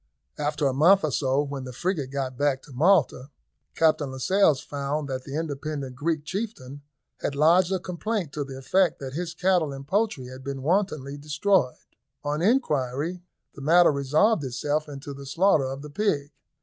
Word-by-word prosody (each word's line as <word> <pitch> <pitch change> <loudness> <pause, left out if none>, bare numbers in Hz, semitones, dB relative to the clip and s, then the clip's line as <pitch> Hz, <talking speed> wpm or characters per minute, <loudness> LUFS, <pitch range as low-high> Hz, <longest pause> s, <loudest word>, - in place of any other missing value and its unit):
After 150 0 -1
a 135 - +2
month 175 +8 +5
or 155 - 0
so, 135 +2 +1
when 140 -2 -5
the 130 - -7
frigate 150 0 -2
got 135 -2 -3
back 135 0 0
to 140 - -14
Malta, 150 -3 +2 0.5
Captain 155 -3 +2
Lascelles 150 +2 +3
found 145 +1 -3
that 130 -1 -4
the 140 - -6
independent 145 -3 -4
Greek 155 +2 -1
chieftain 155 - -5 0.4
had 140 - -3
lodged 170 +5 +4
a 190 - +2
complaint 180 -1 -3
to 150 - -2
the 135 -1 -8
effect 175 +5 +2
that 130 -1 -7
his 170 +1 -4
cattle 180 -4 +2
and 135 0 -8
poultry 200 - 0
had 130 +1 -10
been 135 -1 -5
wantonly 155 -5 0
destroyed. 150 0 +1 0.5
On 150 +1 -1
inquiry, 165 - 0 0.3
the 140 - -11
matter 170 +4 +5
resolved 150 +8 +2
itself 145 +4 -2
into 140 0 -7
the 140 0 -10
slaughter 165 -1 +3
of 135 +2 -5
the 150 - -8
pig. 145 -7 -1
145 Hz, 175 wpm, -26 LUFS, 135-175 Hz, 0.5 s, month